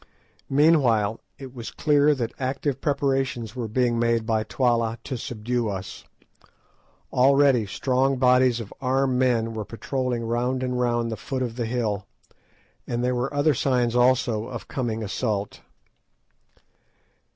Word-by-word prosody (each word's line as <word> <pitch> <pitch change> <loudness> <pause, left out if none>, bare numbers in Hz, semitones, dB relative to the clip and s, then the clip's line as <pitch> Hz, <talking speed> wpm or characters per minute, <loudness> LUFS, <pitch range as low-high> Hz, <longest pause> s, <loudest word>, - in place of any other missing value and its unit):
Meanwhile, 135 -8 +3 0.2
it 130 -2 -10
was 120 -3 -7
clear 150 -1 +3
that 120 -4 -3
active 135 +1 -2
preparations 135 -5 -1
were 120 -3 -3
being 120 +1 +1
made 115 -1 +1
by 110 -1 +1
Twala 115 -1 0
to 130 - -4
subdue 120 0 -2
us. 95 -1 -6 1.1
Already 135 -3 +4
strong 130 +6 0
bodies 125 -1 +4
of 110 -4 -8
armed 130 -1 +1
men 115 -3 +1
were 110 -1 -4
patrolling 120 +2 -3
round 125 +3 -1
and 125 -1 -2
round 120 -1 0
the 110 - -4
foot 130 +5 -3
of 115 -2 -4
the 120 -2 -2
hill, 110 -5 -2 0.8
and 120 0 -2
there 125 0 +1
were 125 +2 -1
other 145 +1 +2
signs 125 -2 +1
also 125 -3 +2
of 120 -2 -7
coming 115 -4 -3
assault. 105 -1 -3
125 Hz, 140 wpm, -24 LUFS, 115-130 Hz, 1.1 s, Already